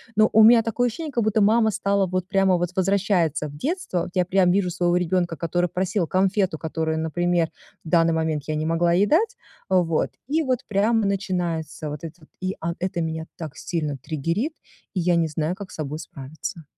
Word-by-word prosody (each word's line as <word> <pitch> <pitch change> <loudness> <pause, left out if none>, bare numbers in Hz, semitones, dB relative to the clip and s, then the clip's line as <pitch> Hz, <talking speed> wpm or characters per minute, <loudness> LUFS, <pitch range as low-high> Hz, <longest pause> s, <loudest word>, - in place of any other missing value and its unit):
Но 215 0 +5
у 220 0 +7
меня 230 +1 +8
такое 240 +2 0
ощущение, 300 +6 -5
как 235 -3 0
будто 215 0 +2
мама 220 +2 +4
стала 200 -1 +1
вот 185 0 -2
прямо, 195 -2 +3
вот, 175 0 -1
возвращается 185 -5 +1
в 145 - -11
детство. 305 - -2
Вот 175 - -5
я 180 -1 +3
прямо 185 -1 +3
вижу 185 -2 +1
своего 175 +1 +1
ребёнка, 175 -1 0
который 175 +1 0
просил 185 0 -1
конфету, 190 -1 +1
которую, 160 0 -2
например, 175 +2 0 0.5
в - - -7
данный 165 -1 +4
момент 160 -3 -1
я 155 - -1
не 155 +1 -1
могла 170 +1 +2
ей 195 +4 +4
дать, 440 +9 +2 0.3
э, 185 -2 +4
вот, 165 -1 0 0.2
и 315 +3 +1
вот 255 -3 0
прямо 215 +2 +2
начинается 170 -6 -2
вот 150 +1 -7
это 160 - -7
вот, 155 - -19
и 185 - -1
ан 170 +1 -2
это 180 -2 -2
меня 160 0 -3
так 160 -2 -7
сильно 150 -5 -3
триггерит, 165 - -2 0.4
и 185 - -1
я 175 0 +2
не 165 -1 +2
знаю, 155 +2 -2
как 200 -1 -9
с - - -10
собой 150 0 -4
справиться. 155 +2 -7
180 Hz, 205 wpm, -24 LUFS, 160-200 Hz, 0.5 s, меня